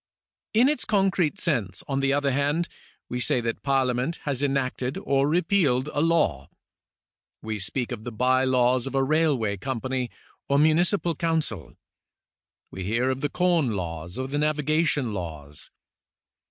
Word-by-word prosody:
In 240 +4 +6
its 295 -3 0
concrete 195 -4 +1
sense, 115 - -1
on 135 -1 -1
the 135 0 +2
other 140 0 +1
hand, 145 +5 +1 0.4
we 125 - -3
say 125 - +1
that 115 0 -3
Parlia 135 -2 +2
ment 130 +7 -1
has 140 -3 -1
enacted 135 -2 -1
or 140 +1 +1
repealed 160 -6 +2
a 145 - +1
law. 150 - +1 0.9
We 110 -1 -3
speak 120 +6 -3
of 115 -3 -5
the 120 - -5
by 130 +3 +2
laws 125 -1 +2
of 135 - -5
a 135 - +3
railway 135 -8 +1
company 130 +2 -3 0.4
or 140 - +3
municipal 170 +4 +3
council. 155 - -2 1.0
We 95 - -6
hear 115 +7 +1
of 130 +1 -4
the 145 - 0
corn 170 -9 +2
laws 85 0 -5
or 130 0 -2
the 145 +2 -2
navigation 150 -3 +1
laws. 75 -6 -6
135 Hz, 155 wpm, -25 LUFS, 120-155 Hz, 1.0 s, In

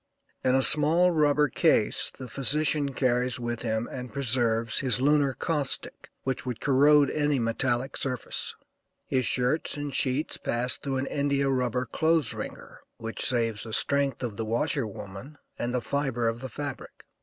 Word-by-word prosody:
In 130 0 +3
a 135 - +3
small 160 +6 +7
rubber 150 -2 +3
case - - +1
the 130 - -8
physician 145 +4 0
carries 125 -1 0
with 120 -1 -4
him 110 0 -2
and 125 -1 -7
preserves 115 -4 +1
his 125 -4 +2
lunar 140 -1 +2
caustic, 145 -1 -2
which 130 -1 -3
would 125 -4 -5
corrode 145 +1 +4
any 150 -2 0
metallic 120 +2 -1
surface. 125 -4 -3 0.5
His 130 -2 0
shirts 125 +5 0
and 145 -1 -5
sheets 135 +3 0
pass 125 +2 0
through 135 -2 -3
an 130 - -2
India 140 -1 0
rubber 125 -1 -1
clothes 160 -3 +1
wringer, - - -8 0.2
which 115 0 -3
saves 115 -4 +1
the 110 - -4
strength 140 0 +1
of 110 -5 -4
the 115 - -2
washer 120 +3 -1
woman 100 +8 -10 0.2
and 120 - -2
the 125 0 -1
fibre 135 -5 -1
of 115 +1 -2
the 130 - -6
fabric. 145 +4 -7
130 Hz, 160 wpm, -27 LUFS, 120-145 Hz, 0.5 s, small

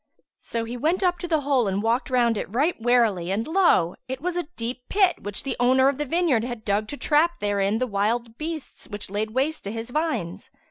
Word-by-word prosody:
So 230 -1 -3
he 235 +2 -5
went 330 +9 0
up 355 -1 +2
to 350 - -4
the 320 -3 +1
hole 270 -5 +2
and 195 +2 -1
walked 235 +3 +1
round 240 -3 +3
it 205 - -4
right 290 +10 +1
warily, 225 -7 +2
and 205 +4 -1
lo! 320 - +3
it 260 0 -4
was 350 +4 -2
a 350 -3 -2
deep 240 +2 -4
pit, 385 -3 +3
which 205 -1 -4
the 270 -2 -2
owner 260 +2 +4
of 280 0 -3
the 295 - -1
vineyard 325 -7 +2
had 240 -2 -6
dug 205 +1 0
to 290 - -6
trap 330 +4 +2
therein 205 0 +1
the 255 - 0
wild 225 +2 -1
beasts 310 +2 -6
which 205 -2 -7
laid 210 +2 -1
waste 270 +6 -1
his 225 +4 -5
vines. 225 - -2
245 Hz, 220 wpm, -24 LUFS, 215-305 Hz, -, owner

